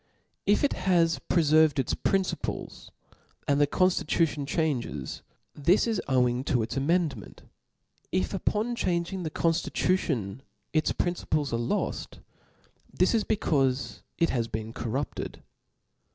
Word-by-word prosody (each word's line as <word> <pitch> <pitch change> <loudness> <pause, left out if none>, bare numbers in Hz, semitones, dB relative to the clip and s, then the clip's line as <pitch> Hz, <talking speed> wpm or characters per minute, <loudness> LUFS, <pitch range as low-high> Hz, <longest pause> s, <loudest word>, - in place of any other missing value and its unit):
If 205 +6 +3
it 285 - +3 0.2
has 165 -2 +3
preferred 155 -2 +4
jts 135 -4 0
principles 195 -1 -2 0.6
and 145 0 +3
the 145 - +5
ponftitution 165 -4 +1
changes, 130 - -2 0.3
this 170 +8 +3
i§ 225 -4 0
owing 125 -1 +2
to 125 -7 +1
its 115 +2 -4
amend 155 +1 +1
ment; 100 - -12 0.7
if 95 -1 0
upon 225 +3 0
changing 180 -2 -1
the 160 - -3
conftitution 155 - 0 0.3
its 155 -1 +2
princi 175 0 -2
ples 150 -4 0
are - - +2
loft, 120 - -2 0.7
this - - +2
is 225 -2 +2
becaufe 130 - 0 0.2
it 165 - +2
has 120 -3 0
been 110 0 -5
corrupted. 130 +5 -4
150 Hz, 125 wpm, -28 LUFS, 125-175 Hz, 0.7 s, the